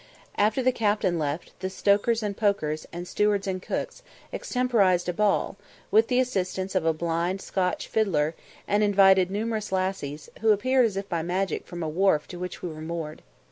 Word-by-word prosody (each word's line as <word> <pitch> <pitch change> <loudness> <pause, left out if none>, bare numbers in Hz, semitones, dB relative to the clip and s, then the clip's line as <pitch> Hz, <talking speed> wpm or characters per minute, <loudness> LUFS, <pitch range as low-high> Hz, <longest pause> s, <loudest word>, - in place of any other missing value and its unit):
After 215 +5 +2
the 255 - +4
captain 205 -7 +1
left, 150 +2 -3
the 185 0 -3
stokers 205 +4 +2
and 205 -1 -2
pokers, 155 -8 0
and 175 +1 -6
stewards 210 0 +1
and 185 -1 -2
cooks, - - -4 0.3
extemporised 210 -9 +1
a 180 - 0
ball, 205 0 +1 0.3
with 220 +2 +5
the 250 0 +2
assistance 190 -6 -1
of 180 -4 +1
a - - +5
blind 170 +3 -1
Scotch 185 -1 -2
fiddler, 165 -8 +1 0.3
and 205 +1 +2
invited 195 -3 +5
numerous 215 +1 -2
lassies, 185 -6 -2
who 225 - +2
appeared 255 +4 +3
as 200 -3 -5
if 195 0 -3
by 170 -4 -1
magic 185 +3 -2
from 175 -1 -6
a - - -2
wharf 160 -1 +2
to 175 - -8
which 180 0 -6
we 180 - -2
were 155 -1 -8
moored. 160 -1 -5
190 Hz, 180 wpm, -26 LUFS, 175-210 Hz, 0.3 s, with